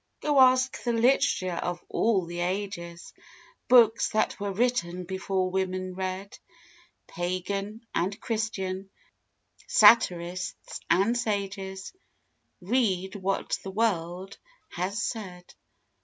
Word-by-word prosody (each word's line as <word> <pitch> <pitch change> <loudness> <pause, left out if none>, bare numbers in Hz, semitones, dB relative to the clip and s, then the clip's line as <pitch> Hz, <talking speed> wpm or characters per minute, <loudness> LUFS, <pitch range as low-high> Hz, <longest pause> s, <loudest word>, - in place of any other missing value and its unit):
Go 295 -2 +2
ask 255 0 +4
the 240 - 0
literature 225 -7 +2
of 175 0 -3
all 205 -6 +1
the 175 +1 -6
ages! 175 -2 -4 0.5
Books 235 -3 +5
that 215 - 0
were 200 0 -2
written 195 -5 0
before 190 0 -2
women 185 0 -2
read! 190 +1 -5 0.7
Pagan 195 +5 -4
and 195 +4 -1
Christian, 195 -4 -3 0.8
satirists 185 - +3
and 195 +7 +3
sages 195 -4 -3 0.7
Read 190 -3 0
what 195 -1 -2
the 195 - -7
world 190 -3 -2 0.3
has 185 +5 -3
said. 180 -5 -6
195 Hz, 100 wpm, -27 LUFS, 185-220 Hz, 0.8 s, Books